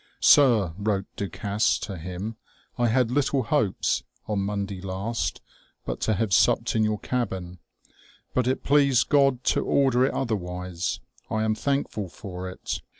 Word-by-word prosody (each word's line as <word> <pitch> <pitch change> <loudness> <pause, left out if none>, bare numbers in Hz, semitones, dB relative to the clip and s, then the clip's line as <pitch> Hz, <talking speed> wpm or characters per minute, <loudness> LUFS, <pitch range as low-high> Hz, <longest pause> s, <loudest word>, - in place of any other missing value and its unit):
" - - -42
Sir/' 115 - +5
wrote 100 -2 0
Du 100 - -3
Gasse 105 +1 0
to 100 - -5
him, 90 +6 -5 0.2
" - - -32
I 120 - +3
had 120 0 +2
little 135 0 +1
hopes, 110 -3 +1 0.2
on 105 -2 -1
Monday 100 -1 -3
last, 95 +5 -3 0.4
but - - -4
to 110 - +1
have 105 +1 -1
supp'd 115 +2 +3
in 110 - +3
your 110 0 +1
cabbin; 95 -7 -3 0.7
but 125 -1 +1
it 130 - 0
pleased 140 -3 +3
God 135 -3 +3
to - - +2
order 130 -3 +3
it - - 0
otherwise. 90 -6 -3 0.3
I 110 0 0
am 110 0 +2
thankful 110 -4 -2
for 90 -1 -7
it. 90 - -5
110 Hz, 160 wpm, -26 LUFS, 95-125 Hz, 0.7 s, Sir